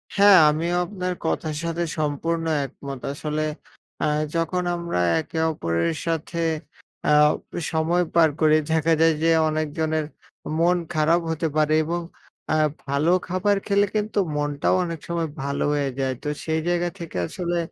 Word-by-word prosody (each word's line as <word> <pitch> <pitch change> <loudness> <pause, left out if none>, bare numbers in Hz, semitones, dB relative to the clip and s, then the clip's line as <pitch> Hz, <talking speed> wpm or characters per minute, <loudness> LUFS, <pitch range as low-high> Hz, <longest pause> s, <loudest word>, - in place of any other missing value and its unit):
হ্যাঁ, 200 -1 +8
আমিও 165 +3 0
আপনার 185 -1 -3
কথার 155 -1 -1
সাথে 170 +1 -1 0.2
সম্পূর্ণ 165 +3 -1 0.2
একমত। 135 0 -8
আসলে 150 +1 -2 0.6
আ - - +3 0.3
যখন 165 +2 0
আমরা 170 - -2 0.2
একে 160 +1 -6
অপরের 85 - -1
সাথে 165 +1 -2 0.7
আ - - +3 0.4
প - - -54 0.2
সময় 165 +2 +2
পার 165 -2 +6
করি, 155 0 +5 0.2
দেখা 160 0 +3
যায় 165 0 +5
যে, 165 - +4 0.2
অনেকজনের 155 0 -1 0.5
মন 175 +1 +4 0.2
খারাপ 160 +3 +3
হতে 160 +1 -1
পারে 155 0 +3
এবং 170 +2 -2 0.5
অ্যা 155 - +2 0.3
ভালো 145 +5 +2 0.2
খাবার 190 +3 +1
খেলে 200 0 +3
কিন্তু 210 0 0 0.2
মনটাও 145 +1 +1
অনেক 165 -2 -4
সময় 170 -2 -2
ভালো 140 0 -1
হয়ে 145 -2 0
যায়। 130 -1 0
তো - - -4 0.2
সেই 160 0 0
জায়গা 175 0 +1
থেকে 165 - -6
আসলে 175 -1 -3
160 Hz, 150 wpm, -24 LUFS, 150-175 Hz, 0.7 s, হ্যাঁ